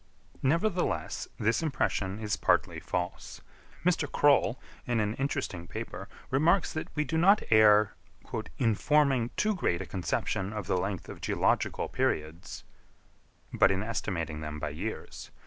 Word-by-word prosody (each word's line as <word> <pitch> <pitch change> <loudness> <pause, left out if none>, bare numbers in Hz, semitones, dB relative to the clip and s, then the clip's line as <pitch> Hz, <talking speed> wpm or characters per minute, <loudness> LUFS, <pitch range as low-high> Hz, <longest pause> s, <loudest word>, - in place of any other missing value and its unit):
Nevertheless 165 - 0
this 110 +7 +1
impression 105 -10 -1
is 105 -2 -1
partly - - +1
false. 90 0 -4 0.5
Mr. 165 -5 +1
Croll, 140 -4 +3 0.3
in 120 -2 +1
an 105 0 0
interesting 135 - -3
paper, 75 - -6 0.2
remarks 165 +8 +3
that 155 - -3
we 150 - +1
do 160 +3 -1
not 195 +5 +5
err 105 -1 +6 0.6
"in 115 -4 +2
forming 135 -1 +2
too 215 0 +2
great 125 - 0
a - - -4
conception 95 +3 -2
of 105 -3 -4
the - - 0
length 95 -1 -3
of - - -9
geological - - +1
periods," 80 +2 -2 0.9
but - - +5
in 95 0 0
estimating 85 -9 -3
them 75 0 -5
by 75 - -3
years. 85 +10 -6
110 Hz, 140 wpm, -29 LUFS, 95-145 Hz, 0.9 s, err